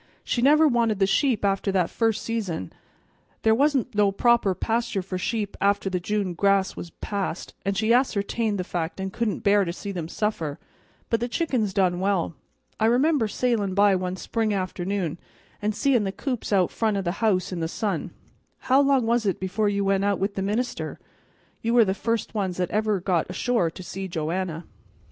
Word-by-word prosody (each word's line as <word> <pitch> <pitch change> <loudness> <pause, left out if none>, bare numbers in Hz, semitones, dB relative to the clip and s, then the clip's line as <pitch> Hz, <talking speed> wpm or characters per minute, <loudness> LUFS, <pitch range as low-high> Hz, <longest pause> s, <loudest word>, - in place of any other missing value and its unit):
"She 240 - -1
never 305 +4 +6
wanted 235 -5 +2
the 195 - +3
sheep 220 +3 +2
after 195 0 +1
that 180 -3 +1
first 225 -2 0
season. 195 - -3 0.7
There 220 - +5
wa'n't 270 -1 +2
no 205 -1 +3
proper 230 -2 +3
pasture 230 -3 -1
for 185 0 -4
sheep 205 +1 -2
after 200 -1 +2
the 180 - 0
June 200 0 -1
grass 195 +1 +2
was 175 - -7
past, 195 0 -4
and 195 0 -1
she 220 +3 +3
ascertained 225 -3 +1
the 180 - -2
fact 175 0 -4
and 190 0 -4
couldn't 230 -3 -1
bear 200 0 +4
to 170 - -2
see 200 +3 -6
them 175 -4 -4
suffer; 165 -7 -2 0.5
but 230 - +3
the 240 - -1
chickens 245 - 0
done 185 -2 +1
well. 190 -3 0 0.5
I 220 - +3
remember 255 +1 +3
sailin' 210 -4 0
by 200 -1 +5
one 185 0 -2
spring 215 +2 -1
afternoon, 185 -2 -2 0.4
an' 210 +1 0
seein' 250 -1 +2
the 195 - -1
coops 250 +3 -4
out 190 -3 +3
front 220 -3 0
o' 195 - -1
the 175 - 0
house 195 -5 +2
in 180 - -3
the 165 - -1
sun. 205 +4 -2 0.6
How 270 +2 +7
long 275 -3 +3
was 230 -1 +1
it 195 - 0
before 195 +3 0
you 200 -1 0
went 195 0 +2
out 200 -1 +2
with 200 +1 -1
the 195 - -3
minister? 225 +5 -2 0.6
You 230 +1 0
were 235 -2 +7
the 190 - +1
first 230 +2 -2
ones 190 -5 -2
that 180 -1 -1
ever 215 0 +1
really 190 -3 -2
got 175 -4 +1
ashore 210 -1 +1
to 185 - -10
see 190 +2 -5
Joanna." 170 0 -3
200 Hz, 195 wpm, -25 LUFS, 185-230 Hz, 0.7 s, How